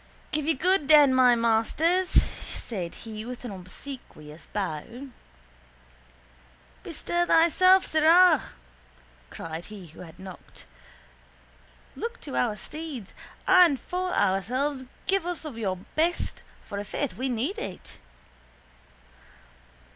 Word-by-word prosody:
—Give 300 -1 -1
you 325 - +3
good 360 -1 +2
den, 295 -3 +7
my 250 -2 +6
masters, 270 +11 +2 0.3
said 180 -7 -5
he 215 -1 -6
with 250 +2 -8
an 240 - -5
obsequious 180 - -10
bow. 205 - -5 1.7
—Bestir 345 - -2
thyself, 370 +3 +5
sirrah! 320 +1 +5 0.9
cried 165 +1 -7
he 205 -4 -10
who 155 - -16
had 165 -2 -11
knocked. 185 -1 -12 1.3
Look - - -5
to - - -7
our 125 +12 +1
steeds. 290 - -7 0.3
And 355 -7 +6
for 365 +1 -3
ourselves 255 - 0 0.2
give 385 -3 +1
us 350 -2 -4
of 295 -6 -6
your 195 -5 -2 0.2
best 335 +3 -1 0.2
for 200 - -5
ifaith 230 +7 -3
we 260 +1 -3
need 255 - -2
it. 185 -2 -8
260 Hz, 110 wpm, -27 LUFS, 200-325 Hz, 1.7 s, den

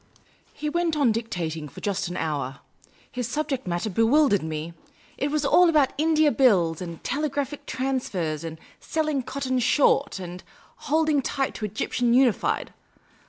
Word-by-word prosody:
He 300 - -5
went 330 0 0
on 275 -6 +4
dictating 170 -9 -3
for - - -11
just 200 -3 -2
an 175 - -5
hour. 140 -4 -3 0.5
His 250 -2 -3
subject 275 -3 -2
matter 175 +4 -1
bewildered 225 +2 +3
me. 160 +1 -5 0.4
It 280 - -1
was 300 0 0
all 350 +5 +5
about 295 -5 +3
India 310 -1 +3
Bills, 185 - +3
and 170 -2 -7
telegraphic 285 0 -2
transfers, 195 - -2
and 160 -1 -6 0.2
selling 310 -3 -1
cotton 260 0 -2
short, 275 +1 +3
and 180 -1 -8 0.5
holding 310 -1 +3
tight 270 +1 -1
to 215 - -4
Egyptian 235 +3 0
Unified. 255 -4 +2
250 Hz, 145 wpm, -25 LUFS, 175-290 Hz, 0.5 s, all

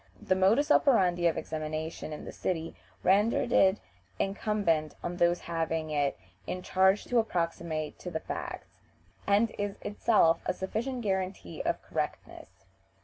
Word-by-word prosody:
The - - +1
modus 220 +11 +3
operandi 180 -13 +4
of 165 - 0
examination 155 0 -4
in 150 - -7
the - - -6
city 165 -2 -3 0.3
rendered 210 +6 +3
it 190 -3 +5 0.4
incumbent 195 - 0
on 175 0 -3
those 175 0 +3
having 165 -1 -2
it 145 -2 0 0.3
in 180 0 -4
charge 190 +2 +3
to 245 - +2
approximate 170 -6 -2
to 180 - -6
the 160 -2 -3
facts, - - -7 0.5
and 210 +3 +3
is 205 -1 -2
itself 205 -6 +3
a - - +2
sufficient 235 +8 -3
guarantee 190 - -2
of - - -1
correctness. 95 - -5
180 Hz, 140 wpm, -29 LUFS, 160-205 Hz, 0.5 s, it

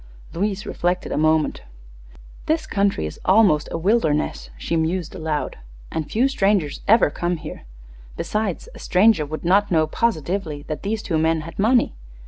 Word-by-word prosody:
Louise 200 +3 -2
reflected 180 +1 -2
a - - -1
moment. 155 0 +2 0.9
"This 315 +1 +1
country 200 - 0
is 75 - -7
almost 190 -7 +4
a - - -2
wilderness," 165 -5 0
she 165 - -2
mused, 165 +1 -1
aloud, 160 - -3 0.3
"and 155 -2 -3
few 245 +5 +2
strangers 195 - +1
ever 220 -8 +5
come 175 +3 -2
here. 155 - -9 0.5
Besides, 210 -4 -2
a - - -12
stranger 185 -5 +3
would 155 +3 -6
not 200 +4 +3
know 160 -3 +3
positively 160 -4 -2
that 155 0 -5
these 210 +2 -2
two 160 -4 0
men 160 0 +2
had 160 +2 -10
money. 235 +5 +3
175 Hz, 155 wpm, -22 LUFS, 155-205 Hz, 0.9 s, ever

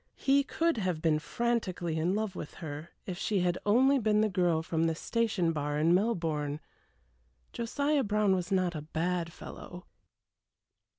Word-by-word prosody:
He 280 +1 +3
could 330 0 0
have 185 -6 -1
been 155 -1 +2
frantically 185 -6 -1
in 175 +4 +1
love 215 -3 -2
with 150 - -7
her 155 -1 -7 0.2
if 180 -2 -5
she 200 -4 0
had 175 0 0
only 265 +6 +5
been 215 -2 +2
the 215 - +2
girl 175 -4 +1
from 165 0 0
the 165 -1 +1
station 210 -4 0
bar 145 -1 -2
in 160 +3 +3
Melbourne. 165 -8 0 0.9
Josiah 280 +5 0
Brown 210 -1 +2
was 180 -1 -2
not 185 -2 +2
a 155 - -4
bad 170 +2 -2
fellow. 180 +1 -10
180 Hz, 160 wpm, -30 LUFS, 165-220 Hz, 0.9 s, only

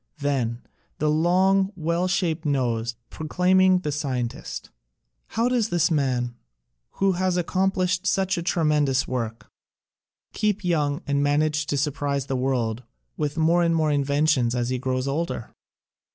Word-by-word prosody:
Then 130 -5 -1 0.3
the 150 0 +1
long, 190 +5 +3
well 170 +2 0
shaped 175 -3 0
nose, 120 -5 0 0.2
proclaiming 185 +3 +3
the 150 - -2
scientist. 130 -5 -4 0.6
How 230 +2 0
does 240 -3 +1
this 175 0 +2
man, 130 -5 0 0.6
who 195 0 +2
has 185 0 0
accomplished 185 +1 0
such 190 0 +1
a 170 - -2
tremendous 150 -6 +1
work, 115 -3 -4 0.8
keep 210 -1 0
young 150 -5 0
and 140 -1 0
manage 150 +1 +1
to 145 - -1
surprise 140 -1 -1
the 135 - -2
world 125 -3 -1 0.3
with 150 +1 -2
more 165 +2 +3
and 165 -1 +2
more 155 -1 +2
new 145 - +2
inventions 140 -3 +2
as 120 0 -1
he 130 0 -1
grows 130 +1 -1
older? 145 -4 -3
150 Hz, 140 wpm, -24 LUFS, 135-180 Hz, 0.8 s, long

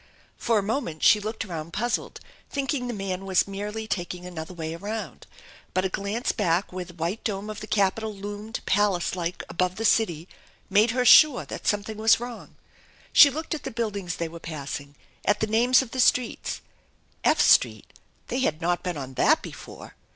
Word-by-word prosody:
For 230 -2 +1
a 205 - +1
moment 200 - -3
she 210 - +7
looked 220 +2 -4
around 165 -3 -6
puzzled, 240 +2 -2 0.3
thinking 270 -2 -2
the - - -2
man 195 -3 -4
was 190 -1 +2
merely 210 +2 -5
taking 180 -3 -4
another 170 -2 -7
way 160 -2 -5
around, 200 - -6 0.5
but 185 0 +2
a - - +1
glance 200 +6 -2
back 180 -2 0
where 185 0 -3
the 175 -1 -14
white 170 +6 -3
dome 210 0 -3
of 210 - -7
the 215 - -8
Capitol 215 +2 +1
loomed, 205 +2 -6
palace 195 -3 +1
like, 175 -1 -3
above 180 +1 -1
the 225 - -3
city, 175 -7 +2 0.4
made 210 +4 +5
her 250 +2 0
sure 295 -1 +7
that - - -7
something 210 +1 -1
was 220 +1 +4
wrong. 240 -1 -8 0.6
She 285 - +9
looked 315 +4 -6
j,t 310 - -2
the - - -4
buildings 205 -6 -3
they 170 - -3
were 170 +1 -10
passing, 145 -3 -6 0.3
at 205 0 +2
the - - +1
names 240 +5 +4
of 240 - -11
the 260 - -4
streets 250 -1 +1 0.6
F - - +3
Street - - +4 0.4
they 250 - -1
had 160 - 0
not 175 +1 0
been 180 -3 -3
on 135 -2 -6
that - - +3
before! - - -10
205 Hz, 190 wpm, -26 LUFS, 175-225 Hz, 0.6 s, She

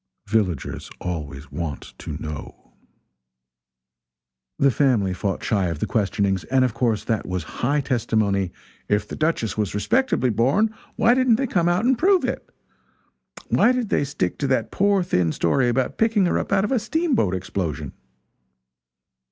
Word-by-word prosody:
Villagers 100 - -1
always 75 -4 -5
want 80 -5 -5
to 75 - -6
know. 75 -1 -8 1.8
The 140 0 +4
family 115 -7 +2
fought 95 +1 -3
shy 105 -5 +1
of 85 -2 -3
the - - -1
questionings, 100 -4 0
and 130 -1 +3
of 125 - -1
course 115 -2 0
that 110 -3 -2
was 90 -2 -2 0.2
high 145 +4 +2
testimony 110 -8 0 0.4
"if 105 0 +1
the - - -6
Duchess 155 -9 -1
was 105 -2 -1
respectably 130 - +1
born, 140 - +2 0.2
why 230 +1 +4
didn't 255 -2 +4
they 270 +4 0
come 175 -8 +1
out 180 +6 +1
and 255 -1 +3
prove 375 0 +4
it? - - -4 1.0
why 240 - +4
did 250 -4 -1
they, - - +2
stick 135 -11 -2
to 140 - 0
that 130 -4 0
poor 200 -1 +2
thin 90 - +1
story 120 - +1
about 125 +1 -1
picking 220 -3 +3
her 175 - +1
up - - -5
out 195 -1 +3
of 210 - -1
a 260 - +3
steamboat 255 - 0
explosion?" 90 -3 -4
120 Hz, 160 wpm, -23 LUFS, -, 1.8 s, The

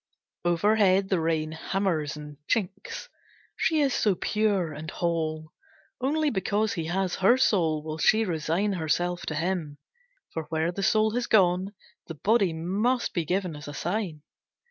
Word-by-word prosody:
Overhead, 190 +2 +3
the 190 - +2
rain 160 -1 0
hammers 160 -3 -1
and 150 -1 -9
chinks. 195 -4 -2 0.5
She 315 -2 +2
is 275 -3 +2
so 205 -3 +2
pure 200 -6 0
and 155 +2 -7
whole. 160 -1 -2 0.5
Only 300 +2 +1
because 205 +1 0
he 165 -3 -3
has 185 +2 -1
her 200 +7 +5
soul 165 -11 +2
will 155 0 -5
she 220 +5 +4
resign 175 +3 0
herself 175 +1 -1
to 155 - -2
him, 165 -3 -2 0.6
for 160 -1 -3
where 160 +2 -1
the 195 - -5
soul 215 +2 +3
has 240 +2 -1
gone, 190 0 +3 0.3
the 165 - -6
body 200 +2 +2
must 200 +10 0
be 170 -3 -1
given 180 -1 -1
as 150 -1 -9
a 145 - -7
sign. 175 -4 -3
180 Hz, 155 wpm, -27 LUFS, 160-205 Hz, 0.6 s, her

